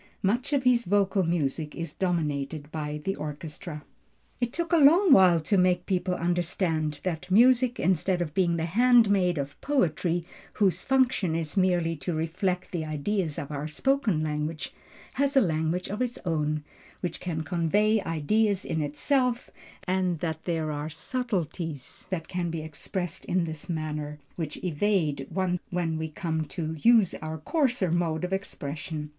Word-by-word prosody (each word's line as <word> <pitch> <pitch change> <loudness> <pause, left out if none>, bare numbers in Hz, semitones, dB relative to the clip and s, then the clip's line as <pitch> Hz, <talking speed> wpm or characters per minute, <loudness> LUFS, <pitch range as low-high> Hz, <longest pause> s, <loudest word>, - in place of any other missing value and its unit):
Much 240 +9 +1
of 280 -3 +2
his 250 -2 +4
vocal 200 0 +2
music 160 -3 -1
is 165 -3 -5
dominated 150 -4 -2
by 150 -1 -4
the 195 - 0
orchestra. 150 +1 -7 0.6
It 240 -1 0
took 340 +4 -2
a - - +6
long 330 +5 +6
while 180 -5 +7
to 190 +5 +2
make 180 -1 +2
people 180 -1 0
understand 170 -3 -1
that 170 -3 -3
music 245 +4 +5
instead 185 +1 +1
of 165 -4 -3
being 175 -2 +2
the 165 - -1
handmaid 205 -3 +4
of 140 0 -5
poetry, 175 - +1 0.3
whose 195 -4 +2
function 255 -10 +2
is 165 +1 -3
merely 175 -3 +2
to 155 +4 -3
reflect 180 +4 -1
the 170 -4 -2
ideas 155 +2 -2
of 145 - -5
our 145 +1 -3
spoken 210 - +1
language, 150 +1 -3 0.5
has 280 0 +2
a - - +8
language 160 0 0
of 210 +5 -4
its 250 -1 -1
own, 155 -2 0 0.4
which 175 -3 -3
can 160 -3 -3
convey 200 +7 +2
ideas 195 +6 +1
in 160 - -1
itself, 250 - 0 0.4
and 185 -2 +1
that 160 0 -4
there 160 -3 -1
are 150 +1 -4
subtilties 165 - -4
that 165 -4 -3
can 175 -1 -2
be 165 -1 -4
expressed 175 +4 -4
in 180 -1 +1
this 160 +1 -6
manner, 150 -2 -3 0.2
which 155 -3 -4
evade 165 -5 0
one 185 -2 0
when 165 -3 -1
we 160 0 -3
come 160 -1 -2
to 160 +1 -4
use 225 -1 +5
our 155 0 -4
coarser 245 - 0
mode 170 -1 0
of 180 +1 -2
expression. 150 -4 -4
175 Hz, 160 wpm, -27 LUFS, 155-200 Hz, 0.6 s, a